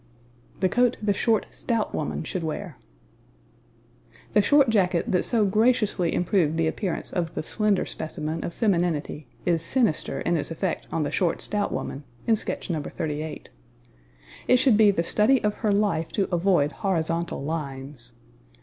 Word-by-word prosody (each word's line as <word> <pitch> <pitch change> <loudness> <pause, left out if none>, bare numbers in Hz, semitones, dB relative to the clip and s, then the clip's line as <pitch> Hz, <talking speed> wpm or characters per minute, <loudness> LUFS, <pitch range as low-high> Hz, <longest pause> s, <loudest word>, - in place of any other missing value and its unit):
The 190 - +4
Coat 245 -1 +4
the 210 -1 +1
Short 220 +2 +1
Stout 230 -3 -2
Woman - - -3
should 185 -3 -4
Wear. 160 -1 -5 1.5
The 210 - +5
short 275 +3 +4
jacket 180 -5 +1
that 180 - +3
so 225 -4 +2
graciously 210 -4 +2
improved 175 -4 +1
the 165 - +2
appearance 175 +3 -3
of 170 -3 -2
the - - -2
slender 210 +2 +1
specimen 160 0 -4
of - - -3
femininity 170 - -1 0.2
is 170 -2 +2
sinister 215 - 0
in 170 0 +1
its 145 - -3
effect 165 +2 -3
on 160 - 0
the 145 - -2
short, 175 -4 0
stout 205 -1 0
woman, 140 - -4 0.2
in 225 - +4
sketch - - -3
No. 160 -4 -1
38. 155 +1 -5 1.0
It 250 - +6
should 250 -3 +4
be 215 -1 +6
the 180 -4 +1
study 215 +9 +3
of 210 0 +1
her 215 - +2
life 200 -6 +1
to 195 - +1
avoid 175 -5 +2
horizontal 170 -5 -1
lines. 135 -5 -6
180 Hz, 160 wpm, -25 LUFS, 160-210 Hz, 1.5 s, It